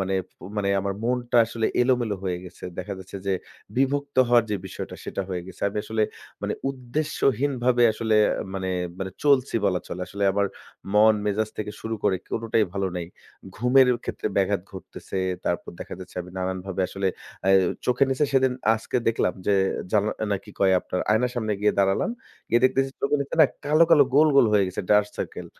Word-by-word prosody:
মানে 95 0 -1 0.4
মানে 100 -1 0
আমার 100 0 -2
মনটা 120 0 0
আসলে 115 0 -1 0.2
এলোমেলো 120 -5 +1
হয়ে 90 -1 -1
গেছে। 90 - -11
দেখা 100 +2 -4
যাচ্ছে 95 +1 -9
যে 95 - +2 0.4
বিমুক্ত 140 +1 0
হওয়ার 120 -1 +5
যে 105 - +1
বিষয়টা - - -7
সেটা 100 - -3
হয়ে 90 -2 -3
গেছে। 95 - -12
আমি 100 - -8
আসলে 110 0 -1 0.4
মানে - - -1 0.2
উদ্দেশ্যহীনভাবে 130 -2 0
আসলে 110 0 0 0.4
মানে 95 -1 -3 0.3
মানে 95 0 -4
চলছি 135 -4 +3
বলা 90 -3 +2
চলে। 90 - -5
আসলে 100 0 -3
আবার 100 +1 +1 0.5
মন-মেজাজ 105 0 +3
থেকে 105 -1 -3
শুরু 110 0 -3
করে 95 -2 +3
কোনটাই 115 -1 +1
ভালো 100 -1 -1
নাই। 85 -1 -4 0.5
ঘুমের 125 +3 +5 0.2
ক্ষেত্রে - - -4
ব্যাঘাত 100 0 +2
ঘটতেছে। 95 +1 -7 0.3
তারপর 85 - -2
দেখা - - -6
যাচ্ছে 90 - -11
আমি 90 - -12
নানানভাবে 95 +1 -3
আসলে, 100 -1 -1 0.4
অ্যা 95 - +3 0.4
চোখের 125 +2 +3
নিচে 135 +3 +2
সেদিন 130 -1 +3 0.2
আজকে 110 +2 -3
দেখলাম 110 -5 +1
যে 100 - +4 0.4
জানা 105 0 +3 0.2
না 100 - +2
কি 105 - -12
কয় 95 -1 +4
আপনার 90 - -3
আয়নার 120 +3 +2
সামনে 110 -3 -1
গিয়ে 105 - +3
দাঁড়ালাম। 95 - +2 0.4
গিয়ে 120 - +3
দেখতেছি 135 +1 +2
চোখের 140 +1 +1
নিচে 140 - -6
না 155 - +9 0.2
কালো, 155 +3 +5
কালো 150 -4 +7
গোল, 155 +2 +6
গোল 125 - +7
হয়ে 100 -2 +4
গেছে, 95 - -4
ডার্ক 105 0 +5
সার্কেল। - - -5
110 Hz, 180 wpm, -25 LUFS, 95-125 Hz, 0.5 s, না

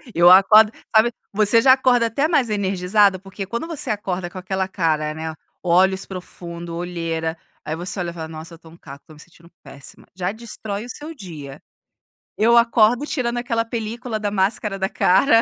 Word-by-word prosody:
Eu 170 +1 +6
acordo 210 +3 +7 0.2
sabe 230 +2 +5 0.2
você 215 +2 +4
já 260 +2 +7
acorda 250 -3 +3
até 280 +7 0
mais 270 -8 +2
energizada, 195 0 +2
porque 195 +1 -7
quando 235 - -4
você 325 -4 -5
acorda 190 -4 -3
com 180 - -11
aquela 190 0 -2
cara, 155 -5 -1
né, 160 0 -5 0.3
olhos 190 +2 +2
profundo, 170 -2 -8
olheira, 165 -2 -3 0.3
aí 155 - -4
você 180 +3 -5
olha 175 -1 -2
e - - -12
fala: 160 -2 -6
"Nossa 160 +1 -10
eu 165 - -20
tô 165 - -16
um 165 - -16
caco, 140 -3 -12
estou 155 - -16
me - - -18
sentindo 170 +1 -18
péssima", 140 - -13
já 180 +1 -2
destrói 220 -1 -6
o - - -12
seu 300 +5 -8
dia. 155 - -10 0.8
Eu 235 +2 +4
acordo 235 +2 +3
tirando 245 -5 -2
aquela 230 -2 -1
película 230 0 -4
da 205 -1 -2
máscara 195 0 -1
da 190 0 -1
cara, 225 +5 +4
195 Hz, 185 wpm, -21 LUFS, 170-230 Hz, 0.8 s, acordo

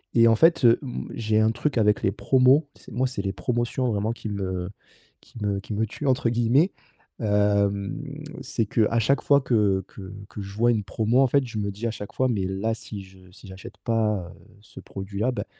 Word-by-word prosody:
et 115 0 +6
en 115 - +5
fait, 165 0 +4
heu, 115 - +6
mmh, 130 -4 -6
j'ai 110 -1 +1
un 110 +1 +3
truc 140 +2 -2
avec 105 -1 +2
les 95 - +2
promos, 130 +6 +3
c'est - - -16
moi 130 +2 0
c'est 125 -6 -4
les 95 0 -2
promotions 120 +1 -1
vraiment 105 +2 0
qui 115 - -8
me 95 -3 -3 0.5
qui - - -17
me 100 -1 0
qui 105 - -7
me 110 +2 0
«tuent» 145 - -7
entre 125 -2 +2
guillemets. 120 - +3 0.5
Hem, 100 +2 +1 0.4
c'est 115 - -1
qu'à 115 +1 +2
chaque 135 +5 +2
fois 140 -1 +4
que 105 -7 +2
que 95 0 -10 0.2
que 105 - -7
je 100 +1 -9
vois 120 +1 +3
une 105 -3 0
promo, 115 +6 +1
en - - +6
fait, 140 +2 +2
je 115 -2 -7
me 100 -1 -2
dis 110 +4 -4
à - - -1
chaque 105 -2 -8
fois: 130 - +1
«Mais 100 -5 0
là 95 +4 -1
si 105 -2 -8
je 95 -1 -18
si 95 - -15
j'achète 95 +1 -11
pas, 105 -6 0
heu, - - -19 0.2
ce 105 - -13
produit-là, 100 +5 -3
bah, - - -4
110 Hz, 220 wpm, -25 LUFS, 100-120 Hz, 0.5 s, et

